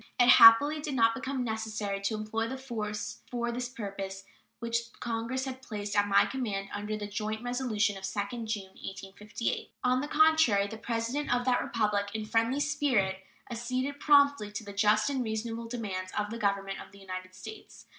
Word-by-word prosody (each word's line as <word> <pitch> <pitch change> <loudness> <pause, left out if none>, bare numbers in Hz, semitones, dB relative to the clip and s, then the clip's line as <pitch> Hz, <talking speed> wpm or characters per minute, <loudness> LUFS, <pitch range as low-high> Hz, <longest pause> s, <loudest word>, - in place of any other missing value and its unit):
It 245 0 +6
happily 270 +7 +9
did 295 -2 -4
not 230 -2 +4
become 265 0 -3
necessary 215 -3 -3
to 200 +2 -1
employ 215 +1 -2
the 265 +3 -5
force 215 -5 -4
for 240 -1 -2
this 245 +1 -3
purpose 195 -5 -6 0.3
which 235 0 -2
Congress 235 +3 -2
had 260 -1 -6
placed 210 -4 -5
at 205 0 +3
my 200 - +5
command 205 -7 -3
under 210 +1 -3
the 210 - -5
joint 215 +2 -3
resolution 240 -5 0
of 190 - -10
2d 205 +4 -3
June, 215 -2 -2
1858. 195 +4 -5
On 255 +1 +3
the 290 - -3
contrary, 310 -10 +4
the 220 +2 -7
President 230 +6 -2
of 245 0 +1
that 250 -1 +3
Republic, 210 -3 0
in 220 - -2
a - - -7
friendly 230 +5 +1
spirit, 270 -11 +1 0.3
acceded 255 +4 -2
promptly 285 -8 +4
to 210 - -5
the 200 -1 -9
just 210 +1 +3
and 270 -3 0
reasonable 225 +1 -3
demands 195 -6 -4
of 210 0 -1
the 230 - -5
Government 200 -2 -1
of - - -12
the 200 - -15
United 185 -1 -7
States. 310 - -11
225 Hz, 185 wpm, -30 LUFS, 205-250 Hz, 0.3 s, happily